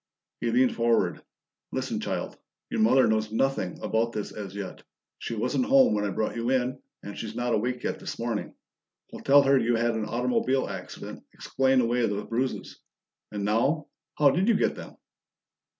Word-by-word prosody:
He 120 - -1
leaned 125 +2 +3
forward. 115 0 +1 0.5
"Listen, - - -2
child - - -3 0.4
your - - 0
mother 130 +4 +5
knows 110 -1 +1
nothing 115 -6 0
about 115 +1 0
this 105 - -4
as 100 -2 -7
yet. 100 -2 -6 0.4
She 115 - -4
wasn't 125 - 0
home 270 - +5
when 105 -1 0
I - - 0
brought 110 +3 -2
you 115 +1 -2
in, 130 0 0 0.2
and 100 - -7
she's 110 -1 -6
not 120 0 -1
awake 120 +3 -1
yet - - -2
this - - -6
morning. 115 -2 -3 0.6
We'll - - -9
tell 140 +1 +6
her 135 0 +4
you 120 0 +2
had 120 +1 +2
an 110 -1 -2
automobile 125 +3 0
accident; - - -8
explain 130 -1 +1
away 120 +1 +1
those 100 0 -3
bruises. 125 +3 -3 0.5
And 105 -1 -3
now, 130 +9 +1 0.3
how 145 -2 +6
did 185 +8 +1
you 230 - +4
get - - +2
them?" - - -10
120 Hz, 180 wpm, -27 LUFS, 110-130 Hz, 0.6 s, tell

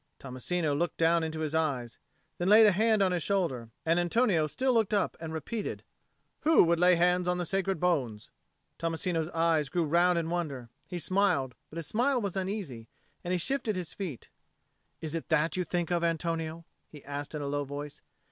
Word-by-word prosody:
Tommasino 145 +5 -2
looked 170 +3 -1
down 165 +1 +3
into 160 0 -3
his 155 -1 -2
eyes; 140 -7 -1 0.4
then 175 - 0
he - - +4
laid 220 +1 +9
a 210 - +6
hand 215 +2 +3
on 185 - +2
his 175 -1 0
shoulder; 155 - -1 0.2
and 165 +2 +3
Antonio 175 -3 +2
still 260 - 0
looked 220 -2 +2
up 205 - 0
and 160 -1 -6
repeated, 205 +7 -4 0.6
"Who 320 +1 +5
would 170 -1 +2
lay 180 0 +6
hands 180 +1 +2
on 180 0 +1
the 175 - -2
sacred 195 0 -1
bones?" 130 -12 -1 0.5
Tommasino's 165 0 -1
eyes 165 -4 +1
grew 175 +2 0
round 170 +3 +3
in 165 0 -1
wonder: 140 -9 -3 0.2
he 180 - -5
smiled, 175 -7 +1 0.2
but 160 - -10
his 165 - -3
smile 250 - +1
was 200 -5 -3
uneasy, 185 - -4 0.4
and 175 - -3
he 185 - +2
shifted 225 +2 -1
his 180 -3 -4
feet. 175 - -6 0.7
"Is 155 -1 -5
it 165 - -4
that 155 +2 +2
you 185 - 0
think 175 -1 -2
of, 170 -1 +1
Antonio?" 165 -1 -2 0.2
he 150 -3 -13
asked 145 +2 -5
in 150 - -3
a - - -3
low 145 0 -1
voice. 145 +1 -7
170 Hz, 195 wpm, -29 LUFS, 155-185 Hz, 0.7 s, laid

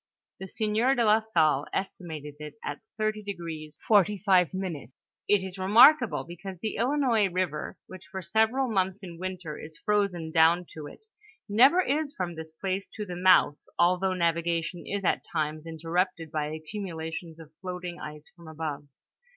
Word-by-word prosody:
The 190 - -6
sieur 220 +7 +1
de 240 -3 +2
la 215 +1 +5
Salle 160 -10 +2
estimated 160 -6 -5
it 150 0 -8
at - - -4 0.2
38° 180 -8 -4
45^ 190 - +2 0.4
It 205 -2 +3
is 190 0 -7
remarkable, 235 +6 +6
because 185 +2 -8
the 215 +4 -3
Ilinois 240 -6 +2
river, 175 -4 -2
which 185 -2 -12
for 190 -1 -6
several 220 - +2
months 190 -2 0
in 170 -3 -9
winter 185 -4 -5
is 155 0 -9
frozen 200 -6 0
down 165 +2 +4
to 155 -2 -7
it, 435 - -14 0.4
never 260 - +6
is 295 0 -1
from 180 -2 -3
this 160 -1 -8
place 190 +4 -3
to 210 - -4
the 180 -2 -6
mouth, 180 -5 +5 0.2
although 180 +2 +3
navigation 170 0 -1
is 200 0 -3
at - - +1
times 155 +1 -2
interrupted 165 0 -2
by 155 -2 -1
accumulations 165 0 -6
of 155 -2 -12
floating 180 -1 -5
ice 150 0 -8
from 170 -2 -15
above. 150 -2 -5
180 Hz, 150 wpm, -28 LUFS, 160-205 Hz, 0.4 s, remarkable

